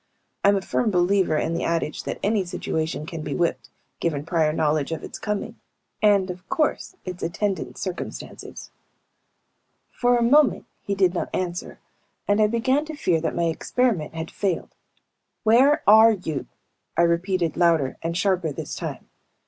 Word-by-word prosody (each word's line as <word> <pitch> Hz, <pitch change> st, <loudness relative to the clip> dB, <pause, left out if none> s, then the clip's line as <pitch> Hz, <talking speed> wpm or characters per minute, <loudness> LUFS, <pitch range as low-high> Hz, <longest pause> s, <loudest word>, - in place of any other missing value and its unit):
I'm 200 Hz, 0 st, +5 dB
a 195 Hz, -, -1 dB
firm 230 Hz, -, 0 dB
believer 180 Hz, -3 st, +2 dB
in 165 Hz, -, -1 dB
the 170 Hz, -, -2 dB
adage 165 Hz, -2 st, -1 dB
that -, -, -3 dB
any 205 Hz, -1 st, +2 dB
situation 160 Hz, -4 st, -3 dB
can 165 Hz, -1 st, -6 dB
be 145 Hz, -2 st, -4 dB
whipped, 130 Hz, -8 st, -1 dB, 0.3 s
given 150 Hz, -4 st, -1 dB
prior 165 Hz, -2 st, +2 dB
knowledge 155 Hz, -1 st, 0 dB
of 160 Hz, -, -4 dB
its -, -, -8 dB
coming 210 Hz, +2 st, -4 dB, 0.4 s
and, 200 Hz, -3 st, +4 dB
of 180 Hz, +1 st, -12 dB
course, 320 Hz, +3 st, 0 dB
its 180 Hz, 0 st, -6 dB
attendant 195 Hz, +3 st, -2 dB
circumstances. 185 Hz, -2 st, -7 dB, 1.2 s
For 245 Hz, 0 st, +2 dB
a 235 Hz, -, +2 dB
moment 285 Hz, +4 st, +4 dB, 0.2 s
he 200 Hz, -, -2 dB
did 185 Hz, -2 st, +3 dB
not 180 Hz, -, -2 dB
answer 175 Hz, -1 st, -3 dB, 0.5 s
and 205 Hz, +1 st, +3 dB
I 210 Hz, -, +5 dB
began 260 Hz, +6 st, +1 dB
to 315 Hz, 0 st, -7 dB
fear 180 Hz, -, +1 dB
that 165 Hz, -, -2 dB
my 170 Hz, -, 0 dB
experiment 170 Hz, 0 st, 0 dB
had 160 Hz, 0 st, -5 dB
failed. 190 Hz, -4 st, -2 dB, 0.7 s
"Where 260 Hz, +7 st, +5 dB
are 220 Hz, +2 st, +8 dB
you?" 160 Hz, -8 st, -4 dB, 0.5 s
I 170 Hz, -, +5 dB
repeated, 170 Hz, 0 st, +1 dB
louder 165 Hz, -6 st, +2 dB
and 170 Hz, +1 st, -2 dB
sharper 185 Hz, -5 st, +1 dB
this -, -, -6 dB
time. -, -, -6 dB
180 Hz, 160 wpm, -24 LUFS, 165-210 Hz, 1.2 s, are